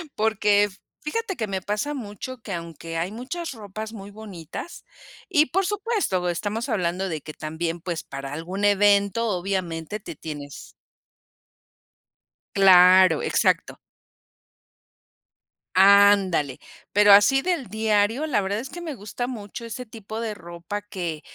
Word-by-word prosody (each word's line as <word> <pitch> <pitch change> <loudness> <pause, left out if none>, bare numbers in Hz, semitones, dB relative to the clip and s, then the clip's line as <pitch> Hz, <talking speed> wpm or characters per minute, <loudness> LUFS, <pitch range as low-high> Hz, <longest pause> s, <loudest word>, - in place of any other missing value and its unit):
porque, 210 -1 +3 0.3
fíjate 395 +6 -3
que 220 - -2
me 190 -1 -3
pasa 210 +10 -2
mucho 250 0 -7
que 205 - -6
aunque 165 -1 -6
hay 170 +4 -2
muchas 270 +10 -5
ropas 215 0 -7
muy 200 -2 -9
bonitas, 205 - -9 0.5
y 310 -4 +4
por 385 +1 0
supuesto, 410 - -1
estamos 210 +8 -3
hablando 185 -3 -1
de 160 -3 -4
que 155 - -9
también, 165 +2 -4
pues, 170 -3 -4
para 135 0 -7
algún 180 +6 -3
evento, 205 +2 +3
obviamente, 180 -1 -3
te 170 -5 -9
tienes 145 - -8 1.9
Claro, 185 -3 +7
exacto. - - +1 2.0
Ándale, 195 -7 +5 0.3
pero 205 0 +6
así 205 +7 +7
del 340 -7 -1
diario, 220 +5 +1
la 255 -9 +1
verdad 200 +1 -1
es 260 +4 -7
que 350 - -8
me 325 -4 -5
gusta 220 +3 -5
mucho 230 -1 -7
ese 250 +2 -6
tipo 220 -1 -7
de 225 -2 -3
ropa 175 +2 -7
que 175 -7 -5
205 Hz, 130 wpm, -24 LUFS, 175-225 Hz, 2.0 s, Claro